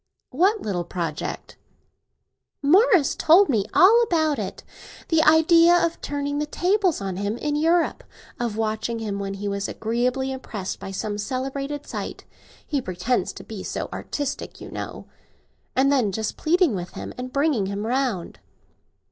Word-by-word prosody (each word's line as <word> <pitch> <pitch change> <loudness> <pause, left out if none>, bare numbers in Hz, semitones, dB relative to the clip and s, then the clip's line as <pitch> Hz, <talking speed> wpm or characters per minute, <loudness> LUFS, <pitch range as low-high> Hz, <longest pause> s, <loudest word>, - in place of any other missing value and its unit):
"What 385 - +2
little 185 -4 -2
project?" 170 -3 -5 1.1
"Morris 365 - +5
told 360 +5 +5
me 215 -7 +1
all 440 +6 +6
about 315 -9 +1
it. - - -5 0.5
The 325 -1 +4
idea 330 +2 +6
of 335 -1 +1
turning 285 0 -2
the 300 - -1
tables 365 - +1
on 190 -2 -3
him, 205 +3 -2
in 295 +3 -2
Europe; 330 +3 +2 0.4
of 235 -3 -2
watching 220 +1 -1
him, 210 -3 -3
when 195 0 -4
he 205 +1 -5
was 200 0 -2
agreeably 250 +4 -1
impressed 215 -7 -5
by - - -7
some 205 +2 -3
celebrated 275 +5 -3
sight—he 285 -3 -6
pretends 225 +5 -1
to - - -10
be - - -8
so - - -4
artistic, 285 -2 -4
you - - -9
know—and 270 +2 -4
then 250 -8 +2
just 215 +2 -3
pleading 340 - +2
with 175 -2 -5
him - - -7
and 250 0 -6
bringing 280 -8 +1
him 200 +2 -3
round." 245 -7 -1
265 Hz, 150 wpm, -24 LUFS, 210-315 Hz, 1.1 s, all